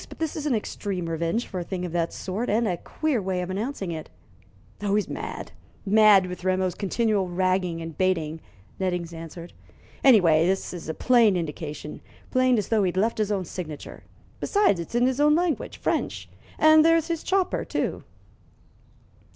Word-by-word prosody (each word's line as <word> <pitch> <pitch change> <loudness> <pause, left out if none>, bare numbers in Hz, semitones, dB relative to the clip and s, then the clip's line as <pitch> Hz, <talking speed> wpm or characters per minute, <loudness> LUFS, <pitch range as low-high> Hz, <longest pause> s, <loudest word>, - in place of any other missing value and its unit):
But - - -11
this 320 -2 -2
is 305 -1 -3
an 265 - +2
extreme 195 -4 -3
revenge 165 +8 -1
for 185 - -5
a - - -3
thing 180 0 -4
of 175 - -5
that 170 -1 -1
sort, 205 +6 -4
and 225 +2 +2
a 180 - 0
queer 290 - -2
way 185 -1 -2
of 180 - -5
announcing 200 -2 -3
it." 160 -1 -6 0.7
"Oh, 205 -1 +1
he's 210 - +1
mad - - -6 0.3
mad 210 -2 +6
with 180 -1 -7
Rameau's 185 -1 +1
continual 205 -1 0
ragging 180 -2 0
and 165 -1 -7
baiting," 160 -3 0 0.4
Nettings 180 -3 -2
answered. 165 +1 -9 0.5
"Anyway, 175 - +6
this 190 0 -1
is 170 -3 -7
a 160 - -3
plain 230 -6 +4
indication 150 -2 -5 0.3
plain 255 -1 +3
as 210 - -2
though 225 -2 +3
he'd 185 -1 0
left 220 +3 +1
his 210 -1 0
own 195 -3 -1
signature. 160 -4 -8 0.4
Besides, 405 - +2
it's 170 +7 -6
in 240 +1 +4
his 260 +1 0
own 300 +1 +5
language 345 -2 -1
French. - - -2 0.3
And 310 0 +7
there's 330 -1 +4
his 335 -1 -2
chopper, 380 -1 0
too." - - -3
190 Hz, 175 wpm, -25 LUFS, 175-235 Hz, 0.7 s, And